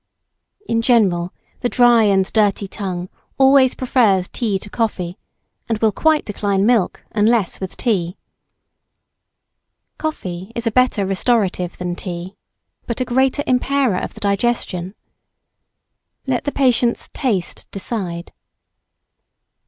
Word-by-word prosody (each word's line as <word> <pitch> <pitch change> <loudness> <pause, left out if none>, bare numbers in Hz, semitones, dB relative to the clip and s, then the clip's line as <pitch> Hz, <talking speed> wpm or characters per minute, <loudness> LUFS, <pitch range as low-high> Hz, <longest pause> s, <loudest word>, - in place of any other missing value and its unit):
In 230 0 +1
general, 190 -8 +2 0.3
the 245 - -1
dry 240 -3 +5
and 195 -2 +3
dirty 205 -2 +2
tongue 185 -3 -4 0.3
always 265 -1 +5
prefers 220 -8 +2
tea 215 -5 -1
to 190 - -11
coffee, 200 -5 -3 0.5
and 225 - +1
will 220 0 +2
quite 310 +7 +2
decline 200 -1 0
milk, 230 -5 +1
unless 215 -2 +1
with 190 -1 -6
tea. 185 -6 0 1.8
Coffee 190 - -4
is 235 - -3
a 230 - +1
better 250 -4 +2
restorative 195 -2 0
than 175 -1 -3
tea, 180 +1 -6 0.5
but 235 - -3
a 255 - 0
greater 265 +3 +1
impairer 255 -4 +1
of - - -6
the - - -12
digestion. 200 -3 -1 1.3
Let 260 -3 -1
the 285 - 0
patient's 245 -4 +1
taste 210 - -2
decide. 190 -4 -4
215 Hz, 120 wpm, -19 LUFS, 190-245 Hz, 1.8 s, dry